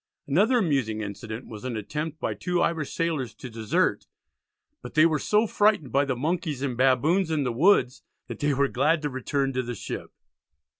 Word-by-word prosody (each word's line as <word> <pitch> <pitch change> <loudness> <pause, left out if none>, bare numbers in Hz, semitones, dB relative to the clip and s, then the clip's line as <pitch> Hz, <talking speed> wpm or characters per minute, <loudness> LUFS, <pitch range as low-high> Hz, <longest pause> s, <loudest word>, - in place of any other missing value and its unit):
Another 205 - +3
amusing 135 - 0
incident 110 +3 -6
was 110 -1 -10
an 125 -3 -3
attempt 150 +8 -4
by - - -2
two 180 -1 -2
Irish 160 -5 0
sailors 155 -8 -2
to 125 - -9
desert, 110 -1 0 0.7
but 125 - -10
they 155 +1 +6
were 155 -2 +2
so 210 +7 +2
frightened 205 - +2
by 140 +3 +3
the 135 -2 -1
monkeys 150 0 -2
and 130 -3 -1
baboons 140 +9 +3
in 155 -3 0
the 125 -3 -1
woods, 145 - +3 0.3
that - - -7
they 145 0 +1
were 140 +1 +2
glad 150 +5 +1
to 145 - -1
return 135 +1 -1
to 130 - 0
the 120 -1 -5
ship. - - -6
140 Hz, 190 wpm, -26 LUFS, 125-165 Hz, 0.7 s, they